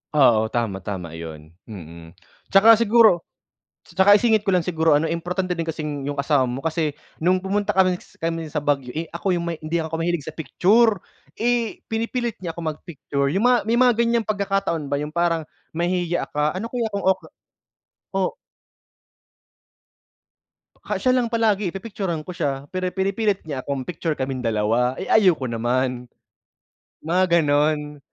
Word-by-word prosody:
Oo, 115 -6 +5
tama, 110 -4 -2
tama 90 -4 -6
'yun, 80 -1 -9 0.2
mm. 85 -5 -11 0.3
'Tsaka 220 +3 +6
siguro 225 -5 +4 0.6
'tsaka 190 +4 +5
isingit 220 -1 +3
ko 195 - +2
lang 180 - +2
siguro 160 -2 +2
ano 155 +2 +1
importante 180 +2 -2
din 165 - -2
kasing 150 -3 -4
'yung 145 - -2
kasama 140 -1 +2
mo 125 +2 -4
kasi 160 -2 -1 0.3
nung 185 +3 +2
pumunta 205 +2 0
kami 185 -1 +3 0.2
kami 165 0 -2
sa 150 0 -3
Baguio 140 -4 -1
eh 165 +1 -4
ako 180 +3 -1
'yung 170 - -1
may 170 -1 -3
hindi 155 +2 -4
ako 160 0 -4
mahilig 170 -2 -1
sa 155 - -6
picture, 205 +5 +2 0.3
eh, 235 -1 -1
pinipilit 230 +1 -2
niya 170 -3 -5
ako 170 - -6
mag-picture, 150 -3 -3
'yung 190 +9 0
mga 250 0 +5
may 230 - +2
mga 250 0 +5
ganiyang 235 -1 +1
pagkakataon 195 -6 -1
ba 140 - -1
'yung 150 0 -5
parang 170 0 0 0.3
mahihiya 175 0 -1
ka, 150 +2 0
ano 225 +5 -4
kaya 240 -3 -1
kung 200 - -2
okey 190 0 +1 0.9
o 195 -1 0 2.5
Ha, - - -1
siya 255 - +2
lang 250 -2 +1
palagi, 215 -4 +1
pipicturan 195 -5 -4
ko - - -4
siya, 140 -5 -2
pero 185 0 -2
pinipilit 195 +2 0
niya 140 -4 -3
akong 140 -2 -3
picture 165 -2 -2
kaming 130 -1 -3
dalawa, 115 +3 +1
eh - - -5
ayaw 190 -6 +5
ko 130 - -5
naman. 125 +2 -1 1.0
Mga 175 +4 +2 0.2
gano'n. 150 0 +1
165 Hz, 160 wpm, -22 LUFS, 145-195 Hz, 2.5 s, Tsaka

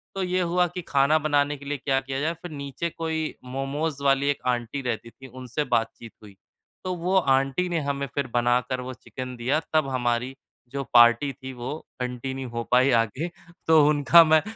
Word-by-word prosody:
तो 195 - -2
ये 185 0 0
हुआ 180 +1 +2
कि 180 +1 -6
खाना 140 +2 +3
बनाने 145 -1 +2
के 140 - -13
लिए 145 +1 -2
क्या 135 +1 0
किया 135 0 -4
जाए? 155 +3 0
फ़िर 170 0 -10
नीचे 140 +3 -4
कोई 160 -1 -3 0.2
मोमोज़ 140 +2 -3
वाली 140 0 +3
एक 145 - -1
आंटी 125 +2 -1
रहती 115 -2 -3
थी, 130 +3 -14
उनसे 130 +3 -4
बातचीत 115 0 -1
हुई। 100 -2 -14 0.5
तो 185 - -2
वो 180 +3 -1 0.2
आंटी 135 +7 +1
ने 170 -2 0
हमें 140 0 -2
फ़िर 140 +1 -3
बनाकर 125 +1 +1
वो 130 +1 -6
चिकन 125 0 -8
दिया 130 +6 +1
तब 155 -3 +3
हमारी 125 0 -1 0.3
जो 140 +2 -4
पार्टी 120 +3 +6
थी 130 0 -9
वो 125 +2 -6 0.3
कंटीन्यू 125 +1 -4
हो 120 0 -4
पाई 130 +2 +5
आगे 115 +9 -2 0.4
तो 160 -2 +6
उनका 150 +3 +7
मैं 155 0 +4
135 Hz, 190 wpm, -25 LUFS, 125-155 Hz, 0.5 s, उनका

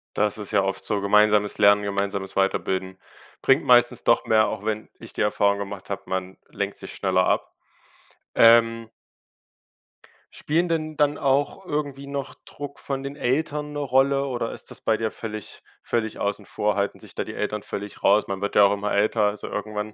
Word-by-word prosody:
Das 105 0 +1
ist 105 - -7
ja 100 - +3
oft 95 0 -2
so. 105 -1 -1
Gemeinsames 105 +1 +3
Lernen, 100 0 +5
gemeinsames 100 -1 -2
Weiterbilden 95 -1 0 0.4
bringt - - +3
meistens - - +4
doch - - +3
mehr, 110 -1 +4
auch 105 -2 -5
wenn 110 0 -2
ich - - -11
die - - -3
Erfahrung 100 -1 +2
gemacht 100 -1 -7
habe, 100 - -4
man 95 0 -4
lenkt - - -4
sich - - -9
schneller 95 -1 +1
ab. - - 0 0.8
Ähm 115 0 +5 1.5
Spielen 170 +4 0
denn 155 -2 -2
dann 145 0 +2
auch 140 +6 +1
irgendwie 145 -4 -4
noch 140 -1 -4
Druck 145 -1 -9
von 135 -1 -4
den 140 +1 -6
Eltern 150 +2 -1
'ne - - -5
Rolle 140 0 +2
oder 125 -3 -3
ist - - -10
das - - -11
bei 110 - +1
dir 110 -1 -2
völlig 110 -2 -7 0.2
völlig 110 -2 -2
außen 100 -1 -3
vor 105 +3 -1
halten 100 0 -1
sich - - -13
da - - -2
die - - -8
Eltern 105 -1 -2
völlig 100 0 -7
raus? 105 +2 +4
Man 100 0 -4
wird 100 - -3
ja 105 - +7
auch 100 0 +5
immer 105 +1 -3
älter. 105 +2 +2
Also, 105 0 -2
irgendwann, 105 0 -4
105 Hz, 185 wpm, -24 LUFS, 100-135 Hz, 1.5 s, ja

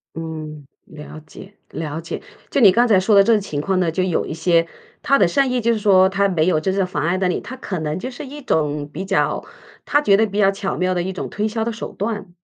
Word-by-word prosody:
嗯， 155 -3 -7 0.2
了 155 0 -11
解 190 +6 -13 0.2
了 160 -1 -5
解。 165 - -6 0.3
就 - - 0
你 200 -4 +8
刚 240 +4 +3
才 200 -4 +4
说 205 +2 +2
的 200 - +7
这 230 - +3
个 210 - +3
情 150 -7 -4
况 190 +2 0
呢， 170 -3 +1
就 185 +2 -1
有 180 -3 0
一 - - -5
些 165 0 +2 0.4
他 275 - +3
的 185 - +5
善 265 +7 +1
意 250 -1 0
就 230 +1 +2
是 215 - -2
说 190 -2 +5
他 200 0 +1
没 170 -3 +1
有 155 -4 +2
真 190 +4 -1
正 195 -2 +1
妨 150 -4 -3
碍 175 +3 +1
到 185 -1 0
你， 180 - -1
他 260 - -8
可 185 -8 -5
能 155 +2 -3
就 255 - -5
是 270 +3 -8
一 290 +2 -9
种 150 - -1
比 190 +5 -5
较 195 0 0 0.4
他 290 - +2
觉 200 -8 +4
得 220 - +3
比 205 0 -5
较 195 -1 +5
巧 195 0 -4
妙 185 0 0
的 175 -1 -1
一 190 - -3
种 - - -5
推 210 +2 -2
销 220 +1 -2
的 235 - -2
手 225 - -7
段。 205 -3 -4
190 Hz, 290 characters per minute, -20 LUFS, 165-215 Hz, 0.4 s, 你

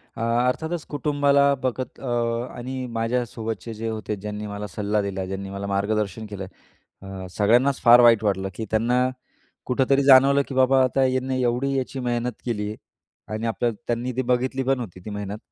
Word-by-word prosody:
अ, - - -6 0.3
अर्थातच, 160 +6 -2
कुटुंबाला 140 -1 +3
बघत 130 0 -3
अ, 135 - -7 0.5
आणि 130 +1 -5
माझ्यासोबतचे 115 -2 -3
जे 110 +1 -5
होते, 110 -1 -3
ज्यांनी 105 +1 -6
मला 105 0 -5
सल्ला 105 +2 -1
दिला, 95 -1 -3
ज्यांनी 95 +1 -5
मला 100 +1 -5
मार्गदर्शन 100 +1 -1
केलं, 100 -2 -6 0.6
अ, 95 -1 -7
सगळ्यांनाच 120 +6 +3
फार 120 +1 +8
वाईट 115 -2 +6
वाटलं, 95 -2 0
की 110 - -4
त्यांना 125 +3 +2 0.6
कुठेतरी 135 +2 +2
जाणवलं, 135 +1 +7
की 135 - -6
बाबा, 130 0 +4
आता 130 +1 +1
ह्यांना 130 0 0
एवढी 130 +2 0
याची 130 +1 -3
मेहनत 120 -1 -1
केली 105 -4 -2
आहे 105 - -5 0.6
आणि 110 +1 -3
आपलं 120 +1 0 0.2
त्यांनी 120 +2 -1
ती - - +2
बघितली 130 +1 0
होती, 120 -9 -1
ती - - -5
मेहनत. 105 0 -5
120 Hz, 165 wpm, -24 LUFS, 105-130 Hz, 0.6 s, फार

